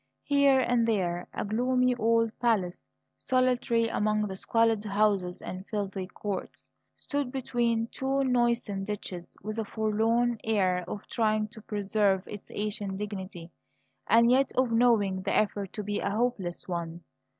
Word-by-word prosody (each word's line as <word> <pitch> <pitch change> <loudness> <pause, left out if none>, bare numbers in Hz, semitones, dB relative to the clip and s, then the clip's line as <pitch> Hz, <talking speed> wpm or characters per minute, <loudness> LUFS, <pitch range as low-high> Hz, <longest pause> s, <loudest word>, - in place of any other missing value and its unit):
Here 280 -2 +4
and 240 -2 +2
there 180 -5 0
a - - -3
gloomy 250 +4 +2
old 230 -1 +2
palace, 205 -7 0 0.3
solitary 250 -2 +2
among 215 -1 +1
the 195 -2 -5
squalid 225 +1 +1
houses 200 -3 0
and 185 0 -6
filthy 195 -3 -3
courts, 195 0 -6 0.3
stood 285 -3 -3
between 235 -3 0
two 270 +1 0
noisome 240 -6 +1
ditches, 195 -4 -6
with 215 +2 -4
a - - 0
forlorn 225 +2 +1
air 185 -5 +1
of 205 - -6
trying 215 -2 0
to 220 0 -13
preserve 205 -2 0
its 205 - -9
ancient 205 -2 -3
dignity 190 -4 -6 0.6
and 235 +1 +5
yet 265 +1 +3
of 255 -2 +2
knowing 225 -5 +3
the - - -1
effort 205 -2 0
to 210 - -4
be 205 0 -2
a - - -1
hopeless 205 -5 -1
one. 170 -1 -4
215 Hz, 145 wpm, -28 LUFS, 195-235 Hz, 0.6 s, and